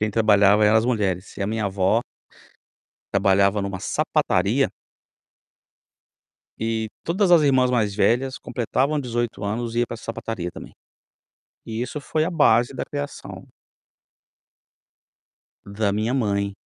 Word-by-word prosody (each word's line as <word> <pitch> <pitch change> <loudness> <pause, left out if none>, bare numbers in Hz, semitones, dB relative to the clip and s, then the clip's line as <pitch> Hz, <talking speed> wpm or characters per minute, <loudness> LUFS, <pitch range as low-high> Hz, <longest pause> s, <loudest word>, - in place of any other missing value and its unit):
Quem 105 0 0
trabalhava 105 -1 +4
eram 105 +1 +5
as 110 - 0
mulheres 100 -6 -1
e - - -3
a - - -1
minha 110 -1 -1
avó 95 +3 +1 1.1
trabalhava 100 +1 +3
numa 100 -1 -4
sapataria. - - +1 1.9
E 110 -1 -1 0.2
todas 185 +2 +1
as 170 -3 +6
irmãs 130 -3 +3
mais 110 -5 +1
velhas 125 +5 +1
completavam 135 +5 -1
18 120 -4 -3
anos 115 +3 -3
e - - +1
ia 120 - +2
para - - -6
essa 115 - -10
sapataria 115 -5 -4
também. - - -11 0.9
E 115 0 -5
isso 125 +5 -4
foi 155 +2 -1
a 170 - -2
base 120 -7 +3
da - - -3
criação 145 -1 -7 2.2
da 100 +1 -1
minha 110 +4 -1
mãe. 100 -5 0
110 Hz, 135 wpm, -23 LUFS, 100-125 Hz, 2.2 s, as